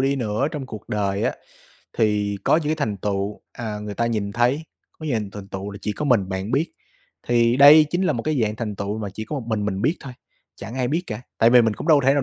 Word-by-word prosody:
đi 135 +1 +1
nữa 115 +2 0
trong 145 -4 -5
cuộc 110 -4 -9
đời 100 -1 -1
á, - - +1 0.7
thì 105 -2 +1
có - - +4
những 160 - -1
cái 155 - +2
thành 105 -7 -1
tựu, 100 +1 -2
à, 110 -3 -5
người 105 0 -6
ta 115 +3 0
nhìn 105 -3 -2
thấy, 125 +8 +1 0.3
có 155 - -7
dành 110 -7 -1
thành 100 -1 -9
tựu 95 +1 -5
là 100 - -8
chỉ 105 - -1
có 150 - -4
mình 115 -9 +2
bạn 95 +2 -3
biết. 140 +7 0 0.6
Thì 120 0 +3
đây 150 +3 +9
chính 175 +2 0
là 185 - +2
một 115 - -3
cái 155 -2 0
dạng 105 0 -1
thành 105 -4 -4
tựu 100 +2 -3
mà 105 -2 -4
chỉ 110 - -5
có 145 - -4
một - - -9
mình 110 -2 -1
mình 100 -1 -2
biết 155 +9 +2
thôi, 135 - -8 0.4
chẳng 105 +4 -8
ai 130 -2 0
biết 160 +6 0
cả. 110 0 -5 0.2
Tại 115 - +5
vì 125 0 +7
mình 110 -2 +1
cũng 155 - -6
đâu 150 -3 +6
thể 135 - +5
nào 145 - +2
110 Hz, 270 wpm, -23 LUFS, 105-135 Hz, 0.7 s, đây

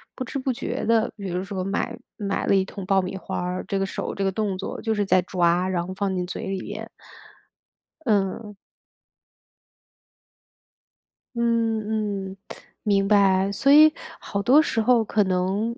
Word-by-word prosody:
不 255 - -4
知 275 - -5
不 260 0 -1
觉 240 - -4
地 225 0 +2
比 200 -3 -6
如 180 +1 -2
说 190 -1 -4
买 195 +2 -2 0.2
买 200 -1 -2
了 - - +4
一 190 - +2
桶 195 0 -8
爆 195 0 +3
米 185 +1 -5
花 190 - -4
儿， 180 +1 -3
这 195 - -2
个 195 - +1
手 190 - -4
这 - - -5
个 - - +3
动 200 -2 -2
作 190 - -5
就 225 -1 0
是 205 -1 0
在 185 -1 +4
抓， 180 0 +1
然 175 -2 -1
后 185 - -5
放 195 0 -1
进 180 -1 -1
嘴 185 - -5
里 190 -1 -3
边。 - - -7 1.2
嗯。 210 0 0 2.8
嗯， 220 -4 0
嗯， 190 - -10 0.5
明 200 -2 +2
白。 195 -1 +4
所 275 +7 +3
以 310 +1 +8 0.3
好 200 - -3
多 265 +8 +6
时 230 -8 0
候 240 0 +4
可 210 0 +2
能， 190 +5 -1
200 Hz, 185 characters per minute, -24 LUFS, 190-220 Hz, 2.8 s, 以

